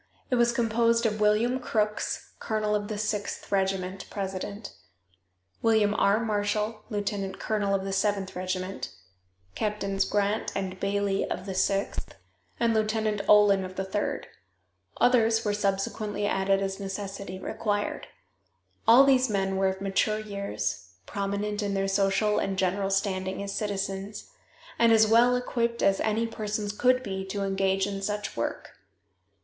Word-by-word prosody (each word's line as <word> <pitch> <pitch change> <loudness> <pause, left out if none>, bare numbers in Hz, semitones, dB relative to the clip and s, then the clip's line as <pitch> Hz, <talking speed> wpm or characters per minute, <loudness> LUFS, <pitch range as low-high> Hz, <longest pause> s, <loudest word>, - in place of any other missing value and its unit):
It - - +4
was 240 0 +4
composed 230 0 +2
of 215 -1 0
William 220 +5 +3
Crooks, 215 -4 -1
colonel 215 -2 -1
of 205 -1 0
the 215 -1 -4
Sixth 210 -1 -3
Regiment, 190 -1 -1
president; 200 +1 -5 0.9
William 220 -2 +3
R. 205 +1 +3
Marshall, 215 0 -1
lieutenant 205 -2 -3
colonel 205 -2 0
of 195 - -1
the 195 - -3
Seventh 195 -1 0
Regiment; 185 +1 -3 0.6
Captains 200 -2 -1
Grant 205 +1 0
and 190 -1 -3
Baily 200 0 0
of 180 - -4
the 195 - -4
Sixth, 195 +1 -1 0.4
and 230 -1 +3
Lieutenant 215 -1 0
Olin 205 -2 +6
of 185 0 -7
the 190 - -2
Third. 195 +2 -2 0.7
Others 230 -2 +4
were 205 - +1
subsequently 205 +1 -1
added 195 -1 +1
as 195 0 -3
necessity 195 -1 -5
required. 205 +1 -2 0.8
All 240 +4 +9
these 260 -2 +4
men 195 -2 0
were 190 0 +2
of 190 0 -2
mature 200 +2 +1
years, 105 - -4
prominent 200 - -2
in 200 -1 -1
their 195 0 0
social 195 +2 +2
and 195 -1 -2
general 195 +1 0
standing 195 -1 -1
as 200 0 -4
citizens, 200 - -4 0.5
and 235 -1 +5
as 220 -1 +6
well 235 +3 +5
equipped 235 -1 -1
as 195 0 +3
any 220 +1 +1
persons 210 -2 -3
could 255 +4 +2
be 190 -3 -4
to 200 +1 -3
engage 195 0 +1
in 200 -1 -4
such 210 +1 -3
work. 115 - -3
205 Hz, 145 wpm, -27 LUFS, 195-215 Hz, 0.9 s, All